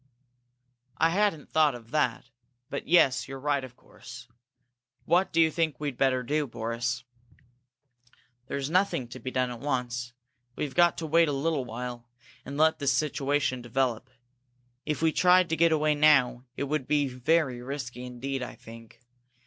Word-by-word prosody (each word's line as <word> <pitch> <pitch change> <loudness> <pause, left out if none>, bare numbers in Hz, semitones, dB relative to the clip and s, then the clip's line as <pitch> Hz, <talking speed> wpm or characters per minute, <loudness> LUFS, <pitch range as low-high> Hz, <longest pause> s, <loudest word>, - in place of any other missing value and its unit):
"I 165 +3 +3
hadn't 195 -5 0
thought 155 -4 +3
of 115 -1 -13
that. 125 -4 -1 0.4
But 140 - -5
yes, 145 -6 +4
you're 135 0 -7
right, 140 0 0
of 125 -1 -10
course. 125 0 -13 0.8
What 180 +3 +2
do - - +1
you 160 -1 +5
think 160 -2 -1
we'd 145 -3 -3
better 130 -2 +2
do, 150 +3 -1
Boris?" 120 +1 -3 1.4
"There's 140 -1 -3
nothing 180 -9 +1
to 130 - -9
be 130 - -5
done 130 -1 -1
at 120 - -7
once. 125 -3 -3 0.4
We've 145 -3 -4
got 175 -1 +4
to 165 - -4
wait 165 +2 +4
a - - 0
little 140 -1 -1
while, 120 0 -7 0.3
and 140 - -7
let 160 +1 +3
the 140 - -4
situation 140 -1 0
develop. 120 0 -1 0.8
If 150 0 -2
we 160 - +4
tried 180 +1 +4
to 165 - +1
get 165 0 +3
away 155 -1 +2
now, 135 -4 +3
it - - -2
would 140 -1 -2
be 145 -2 +2
very 130 0 0
risky 125 -2 -6
indeed, 130 +2 -5
I 125 - -6
think. 115 0 -14
135 Hz, 165 wpm, -28 LUFS, 125-155 Hz, 1.4 s, you